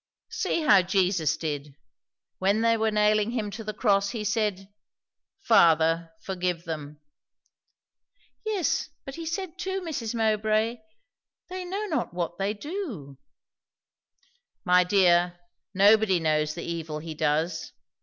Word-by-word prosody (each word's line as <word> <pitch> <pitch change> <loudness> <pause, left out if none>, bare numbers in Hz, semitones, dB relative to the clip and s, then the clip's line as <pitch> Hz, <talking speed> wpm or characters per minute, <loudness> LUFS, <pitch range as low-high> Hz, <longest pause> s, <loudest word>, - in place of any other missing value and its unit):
"See 330 - -1
how 205 -10 +6
Jesus 180 -4 +1
did. 145 -3 -5 0.6
When 200 +3 +2
they 230 0 +3
were 220 0 +1
nailing 210 0 +2
him 225 -4 -3
to 225 +2 -7
the 215 - -3
cross, 200 -2 +2
he 225 -2 -4
said, 205 -2 -1 0.8
'Father, 165 - +4
forgive 180 -3 -2
them.'" 150 -3 -6 1.4
"Yes, 420 -6 -1 0.2
but 270 - -7
he 330 +2 -6
said 365 0 -4
too, 380 +1 -2
Mrs. 270 - -4
Mowbray, 220 +1 +1 0.7
'they 370 0 -5
know 395 +4 -3
not 310 - -2
what 175 0 -3
they 195 +1 0
do.'" 215 - -6 1.5
"My 180 0 +5
dear, 175 -2 +3 0.3
nobody 200 -1 +4
knows 155 -1 0
the 170 - -6
evil 165 -2 -4
he 160 +1 -6
does. 155 +3 -1
200 Hz, 125 wpm, -26 LUFS, 170-230 Hz, 1.5 s, how